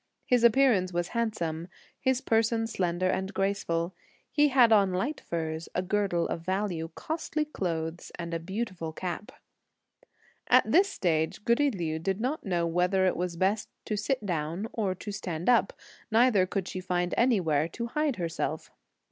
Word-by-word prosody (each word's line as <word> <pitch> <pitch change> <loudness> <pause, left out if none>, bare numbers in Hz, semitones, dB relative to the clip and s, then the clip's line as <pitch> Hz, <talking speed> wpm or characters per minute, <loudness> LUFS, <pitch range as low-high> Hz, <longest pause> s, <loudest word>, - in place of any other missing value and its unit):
His 245 -2 +3
appearance 235 -6 +4
was 175 0 -1
handsome, 175 -8 -2 0.3
his 260 -1 +1
person 225 -2 +2
slender 185 -4 -1
and 190 +1 -1
graceful. 190 -3 -1 0.4
He 295 0 +4
had 255 -4 +5
on 200 -3 +5
light 260 +11 -1
furs, 160 -1 -4
a 180 - +1
girdle 195 -3 0
of 165 - -3
value, 185 -2 -2
costly 310 -1 -2
clothes 165 - -4
and 170 -1 -5
a 165 - -1
beautiful 185 -3 -4
cap. 180 +4 -5 1.2
At - - +6
this 390 +3 +5
stage, 160 - -1
goody 280 +5 +3
Liu 165 -8 -3
did 190 +4 -1
not 260 +7 -2
know 175 -3 0
whether 180 +3 +2
it 185 - +2
was 175 0 -2
best 200 +4 +1 0.2
to 215 - -1
sit 215 +2 -1
down 170 +3 -2
or 200 -5 -1
to 205 - -7
stand 180 -4 -4
up, 235 -5 +4 0.4
neither 225 -4 +4
could 190 -1 -2
she 185 - -5
find 180 -1 -1
anywhere 170 - +2
to 235 +8 -5
hide 295 +3 0
herself. 170 -4 -3
190 Hz, 160 wpm, -28 LUFS, 170-230 Hz, 1.2 s, At